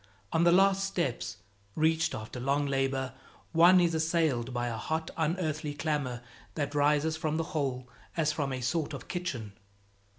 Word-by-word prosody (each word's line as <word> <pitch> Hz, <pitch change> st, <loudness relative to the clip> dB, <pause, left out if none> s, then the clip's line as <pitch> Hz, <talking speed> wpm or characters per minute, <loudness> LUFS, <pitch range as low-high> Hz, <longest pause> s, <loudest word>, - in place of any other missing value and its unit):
On 160 Hz, -, +3 dB
the 170 Hz, -, +6 dB
last 195 Hz, +2 st, +4 dB
steps, 135 Hz, -, -2 dB, 0.4 s
reached 160 Hz, +1 st, +2 dB
after 110 Hz, +3 st, -6 dB
long 140 Hz, +3 st, +1 dB
labor, 135 Hz, -1 st, 0 dB, 0.4 s
one 175 Hz, +3 st, +7 dB
is 170 Hz, -2 st, +3 dB
assailed 160 Hz, -6 st, +1 dB
by 120 Hz, -1 st, -1 dB
a 120 Hz, -1 st, -2 dB
hot, 160 Hz, +7 st, -3 dB
unearthly 155 Hz, -2 st, -1 dB
clamor 145 Hz, -6 st, -2 dB, 0.3 s
that 145 Hz, -2 st, -2 dB
rises 150 Hz, +2 st, +2 dB
from 155 Hz, -1 st, -1 dB
the 165 Hz, -, 0 dB
hole 130 Hz, -5 st, -1 dB, 0.3 s
as 155 Hz, -2 st, +2 dB
from 145 Hz, -3 st, -2 dB
a 130 Hz, -1 st, -3 dB
sort 150 Hz, +5 st, -1 dB
of -, -, -9 dB
kitchen. 130 Hz, -, -4 dB
150 Hz, 160 wpm, -30 LUFS, 130-165 Hz, 0.4 s, one